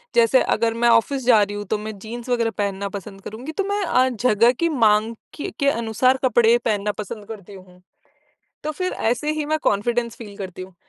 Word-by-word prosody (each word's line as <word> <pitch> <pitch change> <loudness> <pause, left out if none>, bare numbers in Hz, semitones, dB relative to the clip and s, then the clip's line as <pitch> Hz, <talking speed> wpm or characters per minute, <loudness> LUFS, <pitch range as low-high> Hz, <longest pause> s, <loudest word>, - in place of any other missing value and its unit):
जैसे 235 +2 +5
अगर 230 0 0
मैं 240 - +6
ऑफिस 240 +3 +2
जा 235 -4 +6
रही 205 0 -4
हूँ, 205 - -5
तो 215 +2 -1
मैं 215 0 -7
जीन्स 235 +4 -8
वग़ैरह 235 -2 +1
पहनना 200 -1 -2
पसंद 195 0 -11
करूँगी, 235 +10 -7
तो 395 +5 -2
मैं 405 0 0
अ, 255 -6 +3
जगह 235 -1 +3
की 335 - +2
माँग 225 -5 +2 0.2
के 300 - -4
के 280 -1 +3
अनुसार 235 +2 +1
कपड़े 240 -2 +4
पहनना 210 -2 0
पसंद 210 0 -9
करती 205 -3 -9
हूँ। 185 -1 -16 0.8
तो 305 - -2
फिर 365 +4 -3 0.2
ऐसे 295 +5 -3
ही 310 -1 -2
मैं 310 +1 0
कॉन्फिडेंस 235 +3 0
फील 205 -4 -10
करती 185 -2 -7
हूँ। 185 0 -14
230 Hz, 205 wpm, -22 LUFS, 205-255 Hz, 0.8 s, मैं